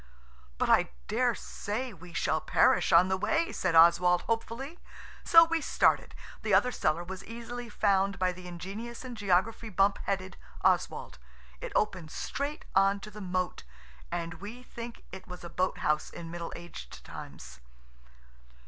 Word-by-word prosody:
"But - - +1
I - - +4 0.2
daresay 225 +4 -1
we 180 -1 -13
shall 155 -1 0
perish - - +3
on 170 +2 +7
the 190 0 +1
way," 330 - +1
said 180 -3 0
Oswald 175 +2 +6
hopefully. 235 +7 -3 0.4
So 330 -1 +8
we 330 0 0
started. - - +2 0.3
The 210 -3 +3
other 250 +6 +4
cellar 170 -7 0
was 190 +1 -7
easily 235 +1 -7
found 200 -2 +2
by 185 -1 +1
the 180 0 -10
ingenious 200 +8 -7
and 250 -2 -6
geography 205 +3 +1
bump 195 0 +2
headed 190 -2 -2 0.3
Oswald. 65 - +1 0.4
It - - -5
opened 185 -6 0
straight 285 - -4
on 195 +1 +4
to 210 - -9
the 210 +1 -9
moat, 185 -1 -2 0.5
and 165 0 -4
we 230 +5 -8
think 235 -1 -9
it 190 0 -9
was 180 -1 -9
a 170 - -8
boathouse 150 -5 0
in 165 -1 -8
middle 170 -1 -5
aged 170 - -10
times. - - -10
195 Hz, 150 wpm, -30 LUFS, 180-230 Hz, 0.5 s, So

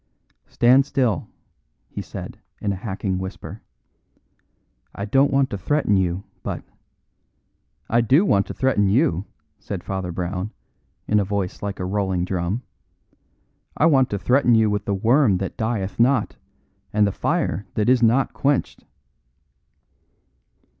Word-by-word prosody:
"Stand 125 +3 +4
still," 120 - 0 0.6
he - - -6
said, - - -8 0.2
in 100 -1 -1
a - - -3
hacking 95 -1 -3
whisper. 95 +1 -7 1.3
"I 100 - -4
don't 135 +6 +3
want 135 -1 +2
to 100 - -4
threaten 120 0 +1
you, 95 0 0 0.2
but - - -5 0.7
" - - -47 0.3
"I 120 +1 +3
do 135 - +4
want 100 - +2
to - - -5
threaten 115 -7 +2
you," 110 - +2 0.3
said - - -6
Father 95 -2 -4
Brown, 90 +3 -4 0.5
in 105 - +3
a - - +2
voice 100 -1 -3
like 100 -1 -4
a 90 - -2
rolling 95 -2 -1
drum, 95 +6 -2 1.1
"I 155 - +3
want 135 -5 +4
to 100 - -2
threaten 125 +4 +3
you 110 -1 +3
with 105 -1 -2
the 100 - 0
worm 115 0 +3
that 95 0 -4
dieth 110 -4 -3
not, 130 +3 +2 0.6
and 105 0 +3
the 100 - +1
fire 95 +1 -1
that 105 - +1
is 125 0 +4
not 120 +4 +3
quenched." 140 0 -1
105 Hz, 145 wpm, -22 LUFS, 95-125 Hz, 1.3 s, Stand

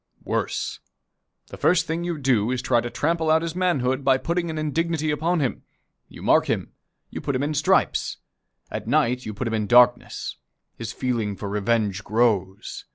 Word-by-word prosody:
Worse. - - -2 0.7
The - - -9
first 165 -2 +3
thing 165 +2 -2
you 175 -2 -2
do 125 -6 +2
is 130 0 -1
to - - -10
try 120 -2 +3
to 120 - -4
trample 160 +4 0
out 160 +1 +4
his 165 0 -4
manhood, 140 -8 +1
by 130 -1 +4
putting 170 +4 -2
an 160 - -4
indignity 155 0 0
upon 160 +3 0
him. 130 - -1 0.5
You - - -11
mark - - +4
him. - - -1 0.4
You - - -5
put 140 - -2
him 130 - 0
in 150 +2 -1
stripes. 150 0 +1 0.5
At - - -5
night 125 +1 +1
you 110 - -4
put 120 +3 -3
him 115 - -2
in 105 -2 -1
darkness. 120 +1 +3 0.4
His 115 -2 -5
feeling 115 -5 -2
for 100 - -6
revenge 105 -1 0
grows. 105 -3 0
130 Hz, 185 wpm, -24 LUFS, 115-160 Hz, 0.7 s, out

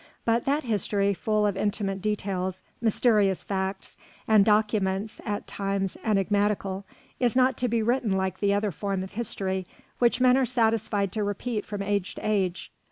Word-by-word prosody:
But 230 +1 +2
that 290 +3 +1
history, 200 -3 +1
full 215 +2 0
of 205 -1 +1
intimate 195 -1 -1
details, 190 -3 -2 0.2
mysterious 210 -4 +3
facts, 190 0 -4 0.3
and 215 -2 +6
documents 210 -1 +1
at 205 -2 -3
times 195 -1 -2
enigmatical, 200 -1 0 0.3
is 245 -1 +1
not 260 0 +4
to 250 - 0
be 230 -1 +1
written 240 -1 +1
like 190 -1 -2
the 200 -1 +2
other 205 0 +1
form 195 +2 -2
of 190 - -8
history 195 -5 -2 0.3
which 240 0 +3
men 255 0 +5
are 270 - +3
satisfied 220 -5 +1
to 215 +1 -1
repeat 205 +2 -3
from 205 -2 -4
age 200 -2 -1
to - - -5
age. 190 -4 -1
205 Hz, 165 wpm, -26 LUFS, 195-220 Hz, 0.3 s, and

